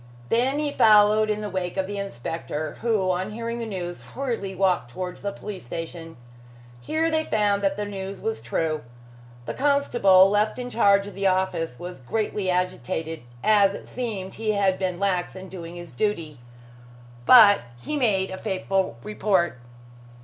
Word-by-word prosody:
Then 255 +5 +2
he 295 -1 -1
followed 215 -2 +5
in 210 0 -1
the 210 - -4
wake 180 0 -3
of 190 - +1
the 200 +1 -5
inspector, 155 -2 -5
who 215 -5 +1
on 185 +3 -2
hearing 230 +1 -4
the 230 - -4
news, 175 -4 -5
hurriedly 230 -8 -4
walked 180 -9 +1
towards 180 +8 -6
the 200 - -2
police 200 -1 -8
station. 165 +4 -7 0.6
Here 320 - 0
they 315 0 +1
found 205 -2 +1
that 195 -1 +1
the 210 - -2
news 195 -1 -6
was 225 0 -3
true. 155 +6 -1 0.6
The - - -4
constable 240 -10 +4
left 210 +3 +1
in 250 0 -5
charge 200 -3 +4
of 205 - -8
the 195 0 0
office 185 -7 0
was 175 -5 -8
greatly 205 - -2
agitated, 165 -3 -2 0.2
as 200 -2 +4
it - - -10
seemed 210 -7 -4
he 220 -1 -1
had 195 -2 +1
been 185 -2 -1
lax 190 -3 0
in 190 0 -9
doing 170 -2 -8
his 175 -1 -9
duty. 155 - -2 0.9
But 215 -5 +9 0.2
he 300 - -4
made 205 -9 +1
a 190 - -6
faithful 190 - -1
report. 190 -9 0
195 Hz, 165 wpm, -25 LUFS, 180-215 Hz, 0.9 s, But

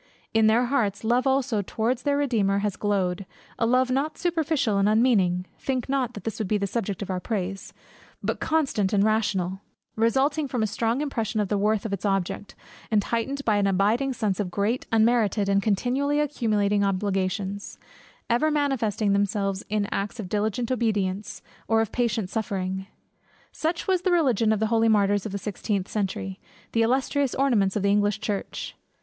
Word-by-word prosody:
In 220 -1 +4
their 230 +3 +4
hearts, 220 -6 0
love 245 +4 +2
also 265 -5 +1
towards 230 +5 -1
their 285 +2 +1
Redeemer 220 -9 +1
has 205 - -1
glowed; 195 -3 0 0.4
a 230 - +2
love 255 +1 +3
not 285 +4 -1
superficial 315 - 0
and 200 +1 +3
unmeaning 205 -6 +3
(think 260 -3 -2
not 265 -3 -1
that 205 - -8
this 225 -1 -4
would 215 - -1
be 210 - +1
the 200 - -1
subject 200 -1 -3
of 190 - -5
our 185 - -1
praise) 195 -2 -4 0.5
but - - -1
constant 270 -11 0
and 200 -1 +4
rational, 195 -4 0 0.3
resulting 270 +7 +2
from 245 -4 -1
a - - +3
strong 230 +5 -1
impression 230 -7 -2
of 205 -2 0
the 205 - +1
worth 210 +1 +1
of 210 - -3
its 195 - -4
object, 195 0 -2 0.3
and 210 -2 +2
heightened 270 +6 -2
by 215 -2 +3
an 200 -1 +2
abiding 210 +8 +2
sense 215 -6 -1
of 200 -3 -1
great, 205 +7 -1
unmerited, 220 -2 +3
and 200 0 +3
continually 255 +8 +1
accumulating 210 -8 +1
obligations; 195 0 -2 0.5
ever 245 +7 +2
manifesting 230 -9 +1
itself 200 -1 0
in 210 -1 0
acts 205 +4 -3
of 205 - -4
diligent 215 +4 -1
obedience, 205 -5 -1 0.2
or 225 0 +3
of 225 -2 0
patient 225 -5 0
suffering. 190 -2 -3 0.6
Such 330 +2 -2
was 375 -2 +2
the 370 - +1
religion 250 - +3
of 215 - +1
the 220 - +1
holy 225 0 +4
martyrs 205 -1 +2
of - - -7
the 200 - -2
sixteenth 200 -1 -3
century, 195 -2 -3 0.3
the 230 - +2
illustrious 265 +3 +1
ornaments 230 -8 +2
of 210 - -1
the 200 - +3
English 205 +1 +2
church. 205 -2 -4
215 Hz, 180 wpm, -25 LUFS, 200-250 Hz, 0.6 s, In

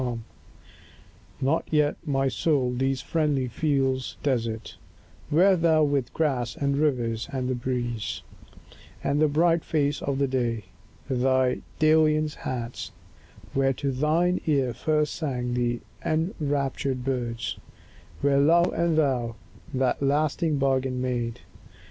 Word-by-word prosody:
XXIV 120 -2 -2 1.2
NOT 140 +5 +1
yet, 150 -1 +2
my 135 -1 +1
soul, 130 -1 +1
these 135 +1 0
friendly 150 -5 0
fields 135 -1 0
desert, 115 -5 -1 0.5
Where 185 +6 +5
thou 160 -2 +3
with 140 -4 0
grass, 130 -7 0
and 140 -1 0
rivers, 120 -7 0
and 130 -2 -2
the 130 - 0
breeze, 120 -2 -3 0.8
And 140 +2 +1
the 155 - +5
bright 165 +3 +2
face 145 -2 0
of 140 0 0
day, 120 -4 0 0.4
thy 130 -1 +2 0.2
dalliance 155 -1 +3
hadst; 120 -1 -5 0.6
Where 135 0 +2
to 135 +1 -2
thine 160 +7 +1
ear 135 -5 +2
first 150 +4 0
sang 125 -6 -2
the 120 -1 0 0.2
enraptured 145 - -1
birds; 120 -3 -2 0.6
Where 140 -1 +3
love 170 +5 +4
and 170 -2 +1
thou 125 -6 +1 0.4
that 130 -1 0
lasting 150 +2 +1
bargain 130 -2 +1
made. 120 -2 -2
135 Hz, 120 wpm, -26 LUFS, 125-155 Hz, 1.2 s, Where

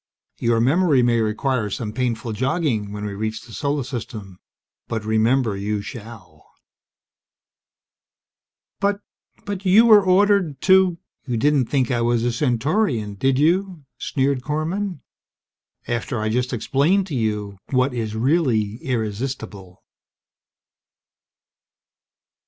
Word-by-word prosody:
Your 115 -1 +2
memory 140 +2 +3
may 120 -1 +2
require 110 +1 -1
some 105 +1 -4
painful 120 -2 -2
jogging 130 - -1
when 105 0 -5
we 105 - -4
reach 110 +2 -3
the 115 - -14
Solar 145 +1 -1
System; 110 -7 -7 0.5
but 110 -2 -4
remember 110 +1 +2
you 100 +1 -2
shall!" 105 - -11 2.3
"But 200 0 0 0.5
you 205 -1 -2
you 205 +4 +6
were 215 -3 +7
ordered 185 -5 +3
to 190 -2 +4
..." - - -50
"You 120 -2 -1
didn't 140 0 +2
think 130 -3 0
I 120 -1 0
was 120 0 +1
a 120 - +1
Centaurian, 125 - 0
did 130 +6 +1
you?" 175 +1 +1
sneered 135 -1 0
Korman. 160 +5 -3 0.9
"After 120 0 -2
I 110 0 -1
just 125 +3 -1
explained 145 - +1
to 165 -7 -5
you 105 -4 -2
what 130 0 +1
is 110 -3 -3
really 115 -5 +1
irresistible?" 110 -5 -4
125 Hz, 120 wpm, -22 LUFS, 110-150 Hz, 2.3 s, were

